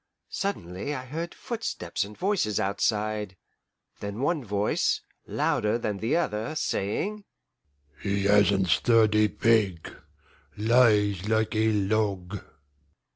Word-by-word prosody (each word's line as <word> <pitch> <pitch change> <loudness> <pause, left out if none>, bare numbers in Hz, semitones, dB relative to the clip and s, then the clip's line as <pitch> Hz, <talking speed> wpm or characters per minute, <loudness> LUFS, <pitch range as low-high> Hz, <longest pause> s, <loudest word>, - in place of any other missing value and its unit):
Suddenly 125 - -3
I 130 -1 -6
heard 165 +6 -5
footsteps 225 - -3
and 105 +1 -10
voices 185 - 0
outside; 105 0 -1 0.6
then 100 +2 -5
one 150 0 0
voice, 105 -1 0 0.3
louder 105 +2 +1
than 105 -4 -3
the 115 +9 0
other, 115 -2 -2
saying, 195 - -2 0.8
"He 100 -1 -1
hasn't 100 -2 +4
stirred 110 +2 +4
a 105 0 +5
peg 105 -7 +1 0.6
lies 105 -4 +3
like 110 0 +1
a 110 +1 +2
log!" 100 -2 0
105 Hz, 110 wpm, -27 LUFS, 100-120 Hz, 0.8 s, a